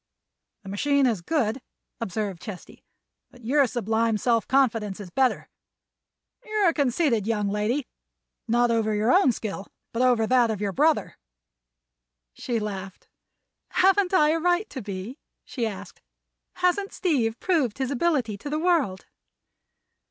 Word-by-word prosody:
"The 195 Hz, -, -9 dB
machine 280 Hz, +7 st, +2 dB
is 225 Hz, -8 st, +1 dB
good," 245 Hz, -, -1 dB, 0.4 s
observed 200 Hz, -4 st, -3 dB
Chesty, 200 Hz, -5 st, -10 dB, 0.5 s
"but 245 Hz, -2 st, -17 dB
your 275 Hz, +2 st, +3 dB
sublime 225 Hz, -1 st, 0 dB
self 230 Hz, +1 st, +1 dB
confidence 225 Hz, -7 st, +1 dB
is 190 Hz, -4 st, -9 dB
better. 260 Hz, +5 st, +1 dB, 1.0 s
You're 425 Hz, -5 st, +2 dB
a -, -, -1 dB
conceited 255 Hz, -, +1 dB
young 210 Hz, -3 st, 0 dB
lady—not 235 Hz, +1 st, -2 dB
over 220 Hz, -2 st, +1 dB
your 215 Hz, +3 st, +2 dB
own 365 Hz, -8 st, +5 dB
skill, 205 Hz, -3 st, -6 dB, 0.3 s
but 230 Hz, -, -1 dB
over 245 Hz, -3 st, +3 dB
that 245 Hz, 0 st, +3 dB
of 215 Hz, -3 st, -2 dB
your 205 Hz, -1 st, -1 dB
brother." 305 Hz, +5 st, +1 dB, 1.1 s
She 235 Hz, -2 st, -3 dB
laughed. 195 Hz, -3 st, -7 dB, 0.6 s
"Haven't 380 Hz, 0 st, +3 dB
I 305 Hz, -6 st, +4 dB
a 330 Hz, -, +1 dB
right 355 Hz, +5 st, +1 dB
to 265 Hz, -, -6 dB
be?" 200 Hz, +6 st, -7 dB, 0.3 s
she 235 Hz, -4 st, -2 dB
asked. 205 Hz, -3 st, -9 dB, 0.5 s
"Hasn't 365 Hz, +3 st, 0 dB
Steve 240 Hz, -10 st, 0 dB
proved 305 Hz, -, 0 dB
his 265 Hz, 0 st, -2 dB
ability 255 Hz, -8 st, 0 dB
to 290 Hz, -, -6 dB
the 300 Hz, -, -1 dB
world?" 315 Hz, -, +1 dB
240 Hz, 135 wpm, -25 LUFS, 210-295 Hz, 1.1 s, own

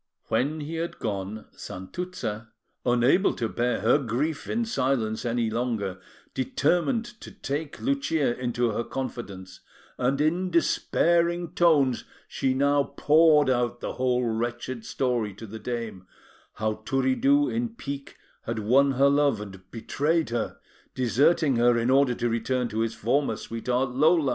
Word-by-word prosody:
When 150 Hz, +4 st, 0 dB
he 160 Hz, +3 st, -5 dB
had 170 Hz, +1 st, -3 dB
gone, 105 Hz, 0 st, -4 dB
Santuzza, 110 Hz, -, -6 dB, 0.3 s
unable 125 Hz, -, +3 dB
to 115 Hz, -, -1 dB
bear 120 Hz, 0 st, -1 dB
her 120 Hz, +7 st, +4 dB
grief 140 Hz, +5 st, -2 dB
in 230 Hz, +1 st, 0 dB
silence 130 Hz, -, -1 dB
any 115 Hz, -1 st, 0 dB
longer, 110 Hz, -5 st, -2 dB, 0.3 s
determined 175 Hz, -, +1 dB, 0.2 s
to -, -, -9 dB
take 145 Hz, +2 st, -5 dB
Lucia 165 Hz, -, 0 dB
into 120 Hz, -1 st, 0 dB
her 115 Hz, -, -2 dB
confidence; 100 Hz, -8 st, -6 dB, 0.4 s
and, 135 Hz, +3 st, +1 dB
in 170 Hz, +5 st, +1 dB
despairing 170 Hz, 0 st, +2 dB
tones, 145 Hz, -8 st, +3 dB, 0.2 s
she 130 Hz, -1 st, -1 dB
now 140 Hz, +1 st, +3 dB, 0.2 s
poured 150 Hz, -1 st, +5 dB
out 120 Hz, -1 st, 0 dB
the -, -, -4 dB
whole 125 Hz, -1 st, +1 dB
wretched 120 Hz, +1 st, -3 dB
story 120 Hz, -6 st, -1 dB
to 110 Hz, -, -9 dB
the 110 Hz, +1 st, -8 dB
dame 110 Hz, -5 st, -5 dB, 0.5 s
how 110 Hz, 0 st, -2 dB
Turiddu, 230 Hz, -, +2 dB
in 235 Hz, +1 st, -1 dB
pique, 140 Hz, -7 st, -7 dB, 0.3 s
had 115 Hz, -, -2 dB
won 135 Hz, +6 st, +3 dB
her 135 Hz, +2 st, +4 dB
love 140 Hz, -5 st, +3 dB
and 95 Hz, -3 st, -10 dB
betrayed 150 Hz, +7 st, -1 dB
her, 120 Hz, -1 st, -2 dB, 0.4 s
deserting 135 Hz, +3 st, +3 dB
her 120 Hz, 0 st, +4 dB
in 115 Hz, +2 st, +1 dB
order 135 Hz, -2 st, +4 dB
to 120 Hz, -, -1 dB
return 120 Hz, +2 st, 0 dB
to 110 Hz, -, -3 dB
his 115 Hz, 0 st, -1 dB
former 130 Hz, +6 st, +1 dB
sweetheart, 125 Hz, +3 st, -2 dB
Lola. 155 Hz, +2 st, +3 dB
125 Hz, 145 wpm, -26 LUFS, 115-150 Hz, 0.5 s, poured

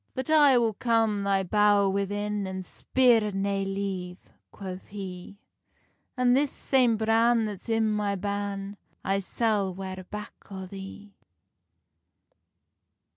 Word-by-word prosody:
"But 260 Hz, +3 st, -3 dB
I 290 Hz, -4 st, +6 dB
will 230 Hz, -2 st, +2 dB
come 225 Hz, -2 st, +1 dB
thy 195 Hz, -1 st, +2 dB
bowr 205 Hz, +1 st, +3 dB
within, 205 Hz, 0 st, -2 dB
An 190 Hz, 0 st, -5 dB
spear 230 Hz, 0 st, +2 dB
nae 195 Hz, 0 st, -1 dB
leave," 195 Hz, -2 st, -5 dB, 0.2 s
quoth 190 Hz, -2 st, -8 dB
he; 195 Hz, -1 st, -8 dB, 0.8 s
"An 250 Hz, -1 st, +4 dB
this 280 Hz, +2 st, +3 dB
same 250 Hz, -4 st, +2 dB
bran 225 Hz, +1 st, +3 dB
that's 210 Hz, +1 st, -7 dB
i 225 Hz, -, +2 dB
my 210 Hz, -2 st, 0 dB
ban, 200 Hz, 0 st, -4 dB, 0.3 s
I 195 Hz, +1 st, +1 dB
sall 200 Hz, -2 st, 0 dB
ware 190 Hz, 0 st, -6 dB
back 210 Hz, 0 st, -7 dB, 0.2 s
on 190 Hz, -2 st, -7 dB
the." 195 Hz, +1 st, -9 dB
205 Hz, 125 wpm, -27 LUFS, 195-225 Hz, 0.8 s, I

